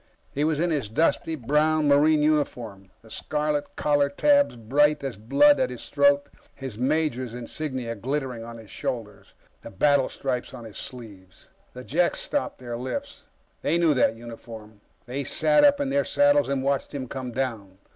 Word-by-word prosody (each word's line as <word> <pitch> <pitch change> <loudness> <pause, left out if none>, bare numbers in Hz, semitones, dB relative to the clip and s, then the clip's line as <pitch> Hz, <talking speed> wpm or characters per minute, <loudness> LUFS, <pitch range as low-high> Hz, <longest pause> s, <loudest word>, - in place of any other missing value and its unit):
He 145 - -1
was 155 -1 +1
in 175 +1 +1
his 140 -9 -1
dusty 160 +5 +1
brown 150 +3 +1
Marine 150 +2 +4
uniform, 120 -10 -1
the 110 - -16
scarlet 150 -1 -2
collar 145 -1 +2
tabs 285 - +3
bright 145 +6 +2
as 135 -3 -4
blood 140 - +4
at - - +1
his 125 -2 -8
throat, 145 0 +3 0.3
his 135 -5 -7
major's 130 -2 -1
insignia 125 -1 -4
glittering 130 +1 -3
at 115 0 -9
his 110 -4 -13
shoulders, 105 -3 -6 0.3
the - - -9
battle 140 +6 +2
stripes 125 -2 -4
on 120 - -9
his 110 -1 -10
sleeves. 100 -8 -11 0.2
The 125 - -9
Jeks 170 +7 +1
stopped 290 - -3
their 120 -2 -6
lifts. 280 - -6 0.4
They 170 - +1
knew 170 -3 +3
that 125 -4 +2
uniform. 115 -2 -11 0.2
They 135 +3 -4
sat 150 +1 +3
up 285 -1 +5
in 280 -1 -1
their 280 0 +2
saddles 285 0 +3
and 135 -1 -1
watched 140 +1 -1
him 130 -2 -4
come 130 -1 -6
down. 115 -7 -4
135 Hz, 170 wpm, -25 LUFS, 115-150 Hz, 0.4 s, up